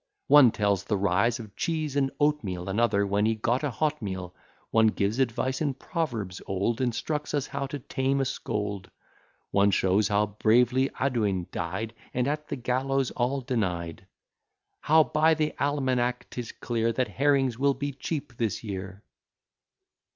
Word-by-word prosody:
One 145 Hz, -3 st, +8 dB
tells 100 Hz, -3 st, 0 dB
the 105 Hz, 0 st, -1 dB
rise 100 Hz, +5 st, +2 dB
of 110 Hz, -3 st, -10 dB
cheese 155 Hz, -4 st, -2 dB
and 135 Hz, -1 st, +2 dB
oatmeal; 105 Hz, -13 st, 0 dB
Another 100 Hz, -1 st, +2 dB
when 100 Hz, +2 st, +1 dB
he 115 Hz, -, +1 dB
got 120 Hz, +5 st, 0 dB
a 145 Hz, -, +1 dB
hot 150 Hz, +3 st, -1 dB
meal; 95 Hz, -3 st, -5 dB, 0.4 s
One 110 Hz, 0 st, +5 dB
gives 105 Hz, +2 st, 0 dB
advice 130 Hz, +2 st, 0 dB
in 145 Hz, -4 st, 0 dB
proverbs 115 Hz, -, -3 dB
old, 100 Hz, +6 st, -1 dB
Instructs 150 Hz, +5 st, -2 dB
us 140 Hz, -2 st, 0 dB
how 140 Hz, 0 st, -4 dB
to 145 Hz, -, -5 dB
tame 135 Hz, +1 st, -1 dB
a 135 Hz, -, +1 dB
scold; 105 Hz, -6 st, -3 dB, 0.6 s
One 100 Hz, 0 st, +4 dB
shows 95 Hz, +1 st, +2 dB
how 105 Hz, 0 st, +2 dB
bravely 125 Hz, +6 st, +2 dB
Audouin 105 Hz, -9 st, 0 dB
died, 95 Hz, +7 st, -3 dB, 0.2 s
And 125 Hz, +1 st, +1 dB
at 150 Hz, +1 st, -2 dB
the -, -, -3 dB
gallows 130 Hz, +1 st, 0 dB
all 130 Hz, +3 st, -1 dB
denied; 95 Hz, -8 st, -3 dB, 0.7 s
How 160 Hz, +1 st, +5 dB
by 155 Hz, +2 st, +3 dB
the 155 Hz, 0 st, 0 dB
almanack 130 Hz, -3 st, 0 dB
'tis 120 Hz, -2 st, -5 dB
clear, 115 Hz, -1 st, -1 dB
That 125 Hz, +2 st, 0 dB
herrings 135 Hz, -3 st, +1 dB
will 140 Hz, 0 st, +3 dB
be 145 Hz, +1 st, -3 dB
cheap 140 Hz, -1 st, -5 dB
this 115 Hz, -2 st, -1 dB
year. 95 Hz, -1 st, -6 dB
120 Hz, 160 wpm, -27 LUFS, 100-140 Hz, 0.7 s, One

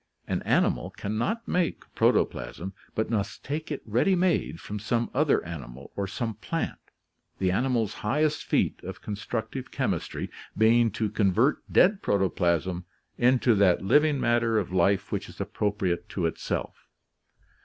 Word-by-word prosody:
An -, -, -1 dB
animal -, -, +1 dB
can 100 Hz, +2 st, -5 dB
not 225 Hz, -, -1 dB
make 180 Hz, -2 st, 0 dB
protoplasm, 95 Hz, +3 st, 0 dB, 0.2 s
but 110 Hz, +1 st, -1 dB
must 100 Hz, -3 st, -2 dB
take 150 Hz, +3 st, -3 dB
it 145 Hz, -, -4 dB
ready 120 Hz, -, +2 dB
made 180 Hz, -1 st, +1 dB
from 105 Hz, 0 st, -6 dB
some 115 Hz, +3 st, -1 dB
other 150 Hz, -, +2 dB
animal, 70 Hz, -5 st, -8 dB
or 100 Hz, -1 st, -2 dB
some 115 Hz, +3 st, -3 dB
plant -, -, -3 dB, 0.3 s
— -, -, -48 dB
the 95 Hz, -1 st, +1 dB
animal's 115 Hz, 0 st, +1 dB
highest 150 Hz, +8 st, +1 dB
feat -, -, 0 dB
of -, -, -8 dB
constructive 110 Hz, +4 st, -4 dB
chemistry -, -, -2 dB, 0.3 s
being 115 Hz, +2 st, +5 dB
to 110 Hz, +1 st, -1 dB
convert 110 Hz, +7 st, +2 dB
dead 195 Hz, +2 st, +5 dB
protoplasm 90 Hz, -2 st, +1 dB, 0.4 s
into 125 Hz, 0 st, +4 dB
that 100 Hz, -4 st, +3 dB
living 145 Hz, +6 st, +4 dB
matter 120 Hz, -2 st, +2 dB
of 95 Hz, -3 st, -1 dB
life 95 Hz, +1 st, +2 dB
which -, -, -3 dB
is -, -, -14 dB
appropriate 100 Hz, -4 st, -1 dB
to 90 Hz, -, -2 dB
itself. 80 Hz, -, -3 dB
110 Hz, 145 wpm, -27 LUFS, 95-130 Hz, 0.4 s, being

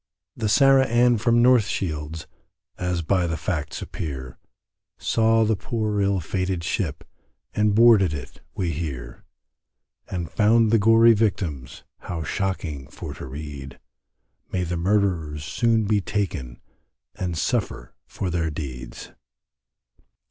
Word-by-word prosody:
The 110 Hz, -2 st, -2 dB
Sarah 135 Hz, +2 st, +5 dB
Ann 120 Hz, 0 st, +3 dB
from 120 Hz, +1 st, +3 dB
North 125 Hz, -4 st, +5 dB
Shields, 80 Hz, -2 st, -4 dB, 0.5 s
As 90 Hz, -2 st, -2 dB
by 90 Hz, +1 st, +1 dB
the 80 Hz, 0 st, -2 dB
facts -, -, -3 dB
appear, 65 Hz, -5 st, -6 dB, 0.6 s
Saw 115 Hz, 0 st, +2 dB
the 110 Hz, 0 st, +2 dB
poor 105 Hz, -1 st, -2 dB
ill 100 Hz, -1 st, +1 dB
fated 90 Hz, +1 st, -2 dB
ship, -, -, -2 dB, 0.5 s
And 105 Hz, -1 st, +2 dB
boarded 110 Hz, -6 st, +6 dB
it 70 Hz, -4 st, -8 dB
we 90 Hz, -3 st, -1 dB
hear; 70 Hz, -6 st, -6 dB, 0.8 s
And 90 Hz, -3 st, -3 dB
found 110 Hz, +2 st, +4 dB
the 115 Hz, -, +5 dB
gory 115 Hz, +2 st, +6 dB
victims 90 Hz, -, -2 dB, 0.2 s
How 85 Hz, -3 st, -5 dB
shocking 80 Hz, -5 st, -3 dB
for -, -, -8 dB
to -, -, -8 dB
read, 70 Hz, -1 st, -8 dB, 0.7 s
May 90 Hz, -, -1 dB
the 90 Hz, 0 st, -2 dB
murderers 85 Hz, -5 st, 0 dB
soon 115 Hz, +7 st, +1 dB
be 105 Hz, 0 st, +2 dB
taken 85 Hz, -, -3 dB, 0.5 s
And 90 Hz, -4 st, -4 dB
suffer -, -, -2 dB
for 95 Hz, -3 st, -4 dB
their 85 Hz, -2 st, 0 dB
deeds. 65 Hz, -6 st, -7 dB
95 Hz, 125 wpm, -24 LUFS, 75-110 Hz, 0.8 s, boarded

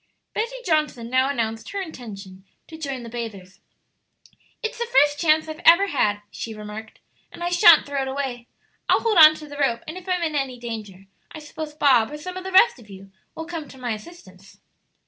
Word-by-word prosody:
Betty 465 Hz, +3 st, -2 dB
Johnson 300 Hz, -8 st, 0 dB
now 260 Hz, +1 st, +3 dB
announced 225 Hz, -5 st, -3 dB
her 400 Hz, -, -4 dB
intention 200 Hz, -, -9 dB, 0.2 s
to 320 Hz, -, -11 dB
join 275 Hz, -6 st, -5 dB
the -, -, -8 dB
bathers. 220 Hz, -6 st, -8 dB, 1.0 s
"It's 450 Hz, +2 st, -4 dB
the 475 Hz, -, -2 dB
first 290 Hz, -, +3 dB
chance 315 Hz, -1 st, +3 dB
I've 315 Hz, 0 st, -7 dB
ever 390 Hz, +4 st, +6 dB
had," 205 Hz, -, 0 dB
she 225 Hz, -1 st, -6 dB
remarked, 215 Hz, +1 st, -9 dB, 0.3 s
"and 345 Hz, -, -9 dB
I 350 Hz, -, 0 dB
shan't 345 Hz, -2 st, +7 dB
throw 280 Hz, -1 st, -2 dB
it 265 Hz, -, -3 dB
away. 265 Hz, -3 st, -4 dB, 0.4 s
I'll -, -, +4 dB
hold 440 Hz, -6 st, +2 dB
on 310 Hz, 0 st, +9 dB
to 305 Hz, -1 st, -10 dB
the 290 Hz, 0 st, -10 dB
rope, 240 Hz, -5 st, 0 dB
and 315 Hz, +4 st, -6 dB
if 370 Hz, +1 st, -12 dB
I'm 360 Hz, -1 st, 0 dB
in 315 Hz, -2 st, -1 dB
any 270 Hz, -3 st, -2 dB
danger 215 Hz, -5 st, -8 dB, 0.3 s
I -, -, -9 dB
suppose 300 Hz, 0 st, -8 dB
Bob, 260 Hz, -7 st, +4 dB
or 300 Hz, -, -7 dB
some 365 Hz, +5 st, -7 dB
of 370 Hz, -, -6 dB
the 380 Hz, -, -6 dB
rest 380 Hz, -, +5 dB
of 215 Hz, -3 st, -17 dB
you, 195 Hz, 0 st, -12 dB, 0.2 s
will 320 Hz, -, -6 dB
come 325 Hz, -3 st, -6 dB
to 265 Hz, -, -14 dB
my 245 Hz, -2 st, -4 dB
assistance?" 210 Hz, -, -11 dB
280 Hz, 205 wpm, -23 LUFS, 225-320 Hz, 1.0 s, on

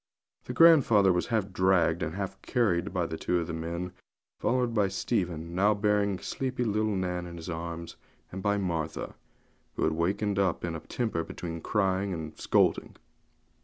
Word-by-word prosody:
The -, -, -5 dB
grandfather 120 Hz, -, +6 dB
was 90 Hz, -, 0 dB
half 105 Hz, -4 st, -1 dB
dragged 90 Hz, -3 st, +3 dB
and 80 Hz, +1 st, -3 dB
half 100 Hz, -1 st, -5 dB
carried 100 Hz, -7 st, +1 dB
along 90 Hz, -4 st, -2 dB
by 80 Hz, -, -3 dB
two 90 Hz, -, 0 dB
of 85 Hz, -, -2 dB
the 85 Hz, -, -5 dB
men, 85 Hz, +2 st, -4 dB, 0.5 s
followed 125 Hz, -2 st, +1 dB
by 105 Hz, -3 st, +3 dB
Stephen 90 Hz, -5 st, -2 dB, 0.3 s
bearing 100 Hz, -2 st, +2 dB
sleepy 130 Hz, +5 st, -3 dB
little 110 Hz, -1 st, 0 dB
Nan 90 Hz, -1 st, -2 dB
in 85 Hz, 0 st, -8 dB
his 85 Hz, +1 st, -6 dB
arms, 85 Hz, 0 st, -6 dB, 0.3 s
and 95 Hz, -, -6 dB
by 100 Hz, +1 st, +1 dB
Martha, 85 Hz, -5 st, -3 dB, 0.6 s
who -, -, -1 dB
had -, -, +2 dB
wakened 100 Hz, +5 st, 0 dB
up 95 Hz, -3 st, +1 dB
in 85 Hz, -1 st, -3 dB
a -, -, -4 dB
temper 110 Hz, -3 st, -2 dB
between 85 Hz, -1 st, -6 dB
crying 95 Hz, -1 st, 0 dB
and 80 Hz, -1 st, -6 dB
scolding. -, -, +2 dB
95 Hz, 165 wpm, -29 LUFS, 85-105 Hz, 0.6 s, grandfather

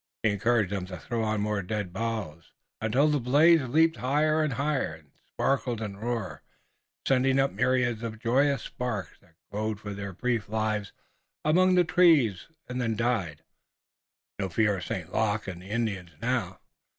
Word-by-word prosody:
He 110 Hz, -, +3 dB
encouraged 110 Hz, -1 st, +1 dB
them 95 Hz, -2 st, -3 dB
to 90 Hz, -1 st, -7 dB
throw 115 Hz, +7 st, -3 dB
on 110 Hz, -1 st, 0 dB
more 105 Hz, -1 st, 0 dB
dead 100 Hz, -1 st, -4 dB
boughs, 100 Hz, -7 st, -4 dB, 0.3 s
until 120 Hz, +7 st, +3 dB
the 150 Hz, -1 st, +2 dB
blaze 150 Hz, +7 st, +5 dB
leaped 160 Hz, +6 st, +2 dB
higher 150 Hz, +4 st, +2 dB
and 150 Hz, -3 st, -1 dB
higher 135 Hz, -, -1 dB
and 75 Hz, -3 st, -20 dB, 0.2 s
sparkled 130 Hz, -4 st, 0 dB
and 105 Hz, -2 st, -6 dB
roared, 110 Hz, -9 st, -3 dB, 0.7 s
sending 135 Hz, 0 st, +3 dB
up 135 Hz, 0 st, +2 dB
myriads 125 Hz, -3 st, +1 dB
of 115 Hz, -1 st, -5 dB
joyous 135 Hz, +4 st, +2 dB
sparks 120 Hz, -6 st, -4 dB
that 85 Hz, -2 st, -27 dB, 0.2 s
glowed 110 Hz, 0 st, -2 dB
for 105 Hz, -1 st, -6 dB
their 100 Hz, 0 st, -5 dB
brief 115 Hz, +2 st, -2 dB
lives 110 Hz, -2 st, -1 dB, 0.5 s
among 185 Hz, +4 st, +4 dB
the 180 Hz, -, +5 dB
trees 160 Hz, -, +4 dB, 0.2 s
and 125 Hz, 0 st, -3 dB
then 115 Hz, -2 st, 0 dB
died. 105 Hz, -10 st, -1 dB, 1.0 s
No 95 Hz, -1 st, -1 dB
fear 105 Hz, +2 st, +2 dB
of 90 Hz, -, -6 dB
St. 90 Hz, -6 st, -5 dB
Luc 105 Hz, -1 st, 0 dB
and 90 Hz, -2 st, -6 dB
the 95 Hz, -, -12 dB
Indians 105 Hz, -5 st, -2 dB
now! 115 Hz, -6 st, -2 dB
115 Hz, 165 wpm, -28 LUFS, 100-130 Hz, 1.0 s, blaze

